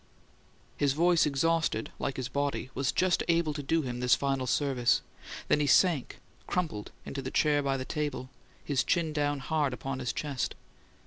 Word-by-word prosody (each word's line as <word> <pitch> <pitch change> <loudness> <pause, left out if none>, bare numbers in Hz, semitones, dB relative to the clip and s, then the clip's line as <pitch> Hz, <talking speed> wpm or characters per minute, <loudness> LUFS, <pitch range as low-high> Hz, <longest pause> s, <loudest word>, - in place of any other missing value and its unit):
His 140 -2 +2
voice, 170 +1 +4
exhausted, 155 -4 0
like 135 - -2
his 130 -2 -2
body, 140 -1 -2
was 135 -1 0
just 185 -1 +2
able 165 -2 +2
to 145 - -4
do 160 +3 +1
him 125 -2 -4
this 125 0 +4
final 135 -2 -1
service; 125 -2 +2 0.4
then - - +3
he 145 - +1
sank, 165 -4 +3 0.3
crumpled, 155 -13 -2
into 135 - -5
the - - -4
chair 150 -1 +2
by 135 -1 0
the 130 - -4
table, 145 -4 -3 0.3
his 140 -4 +1
chin 165 -3 0
down 145 -1 0
hard 145 -1 0
upon 130 +2 -4
his 125 -1 -1
chest. 140 -4 -3
145 Hz, 175 wpm, -29 LUFS, 130-155 Hz, 0.4 s, voice